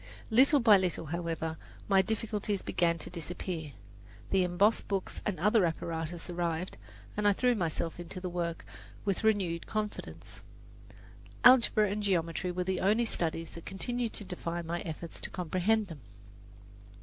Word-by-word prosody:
Little 270 +6 +6
by 220 -5 +7
little, 180 -3 -1
however, 165 0 -3 0.3
my 195 -1 +5
difficulties 210 -1 -2
began 170 -1 +1
to 165 - -5
disappear. 170 -2 -5 0.6
The 190 -1 +4
embossed 180 +5 +2
books 195 -2 -2
and 200 -6 -2
other 210 +3 +4
apparatus 165 0 -2
arrived, 175 0 -2 0.4
and 210 0 +1
I 205 - +6
threw 250 +4 +2
myself 170 -4 -2
into 175 +2 -6
the 185 - -4
work 170 -2 -3 0.4
with 200 +1 0
renewed 190 -6 +1
confidence. 215 -1 -5 1.0
Algebra 235 -4 +7
and 210 +1 -2
geometry 180 -2 0
were 180 +1 -1
the 185 0 -1
only 215 +5 +3
studies 165 -5 -1
that 170 - -10
continued 235 +4 -2
to - - -2
defy 175 -2 -4
my 170 +1 -3
efforts 165 0 -7
to - - -1
comprehend 185 +5 +1
them. 165 -6 -9
180 Hz, 150 wpm, -31 LUFS, 170-210 Hz, 1.0 s, by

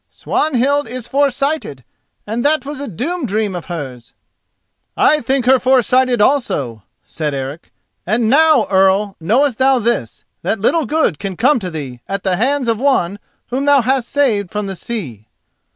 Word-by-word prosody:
Swanhild 285 0 0
is 250 -2 -6
foresighted, 275 - -1 0.4
and 225 +3 -3
that 305 0 +1
was 290 -1 -6
a 285 - -5
doom 290 - -4
dream 210 -1 -1
of 175 -2 -6
hers." 135 -7 -7 0.8
"I 305 - +4
think 260 +1 0
her 260 +1 +5
foresighted 255 0 +2
also," 145 - 0 0.2
said 150 -3 -4
Eric. 135 +4 -6 0.3
"And 220 +4 0
now, 300 -1 +4
Earl, 195 +1 +3
knowest 240 - +1
thou 265 0 +4
this: 235 0 -2 0.2
that 220 - -1
little 300 +8 +1
good 300 - 0
can 195 -3 -5
come 255 +3 +3
to 185 -4 -5
thee 140 -7 -7
at 195 -1 -3
the 185 -2 0
hands 260 +4 0
of 225 -2 0
one 205 -8 +1 0.3
whom 265 +3 -1
thou 285 -2 +5
hast 255 0 0
saved 225 -10 +1
from 210 +2 -3
the 195 -1 -5
sea." 145 - -6
235 Hz, 165 wpm, -17 LUFS, 190-275 Hz, 0.8 s, her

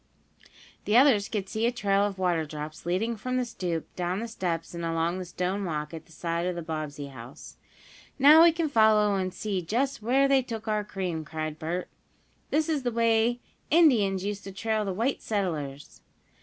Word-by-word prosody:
The 210 +3 +4
others 250 -7 +5
could 200 -3 -3
see 220 +4 0
a - - +2
trail 200 -4 +1
of 205 -1 -2
water 175 -3 +1
drops 150 +1 -7
leading 215 +7 0
from 255 +4 -3
the 250 - 0
stoop 175 -8 -3
down 180 +1 -2
the 230 - -4
steps 175 -8 -3
and 170 0 -5
along 165 +2 -1
the 185 - -5
stone 180 +3 -2
walk 150 -3 -3
at 160 0 -8
the - - -21
side 170 +2 -2
of 180 - -2
the 170 - -5
Bobbsey 150 -3 -5
house. 125 0 -11 0.6
"Now 295 +4 +8
we 335 0 +8
can 330 0 -1
follow 215 -5 +4
and 185 -1 -1
see 195 0 -3
just 250 +9 -1
where 265 +5 +3
they 275 -1 +4
took 225 -3 -7
our 215 -1 0
cream!" 185 -6 -4
cried 155 -1 -5
Bert. 175 +3 -3 0.6
"This 310 +1 +1
is 310 -3 0
the 250 - -1
way 230 +1 +2 0.3
Indians 220 - +4
used 205 0 -3
to 195 - -6
trail 215 +2 -1
the 195 - -2
white 230 +8 -1
settlers." 155 -9 -3
195 Hz, 195 wpm, -27 LUFS, 170-230 Hz, 0.6 s, Now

